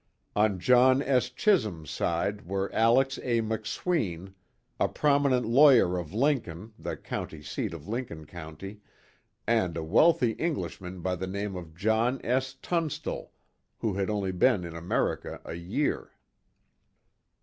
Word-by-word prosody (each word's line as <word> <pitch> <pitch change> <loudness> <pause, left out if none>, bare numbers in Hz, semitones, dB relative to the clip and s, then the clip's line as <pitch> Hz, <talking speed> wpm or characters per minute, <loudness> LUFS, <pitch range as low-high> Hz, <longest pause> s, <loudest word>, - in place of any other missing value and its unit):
On 105 -2 +3
John 130 +6 +5
S. 125 -3 +2
Chisum's 110 - +1
side 100 +3 -1
were 95 +1 -2
Alex 130 +4 +3
A. 120 -2 0
McSween, 110 - -2 0.5
a - - +3
prominent 140 -4 +2
lawyer 120 -6 +6
of 85 -4 -7
Lincoln 110 - -1
the - - -4
County 75 -2 -6
seat - - -3
of 85 -1 -9
Lincoln 105 -9 -4
County 85 +5 -9 0.7
and 95 -8 +1
a 80 - -3
wealthy 125 - +4
Englishman 95 - -4
by 90 +1 -1
the 95 +1 -4
name 100 +1 -3
of 85 -3 -8
John 110 +7 +1
S. 130 +2 0
Tunstall, 165 -4 -2 0.5
who 110 - -1
had 95 +1 -1
only 100 -3 -1
been 95 +2 +3
in 85 -1 -7
America 85 +1 -2
a - - -6
year. 90 - -2
105 Hz, 135 wpm, -28 LUFS, 90-130 Hz, 0.7 s, lawyer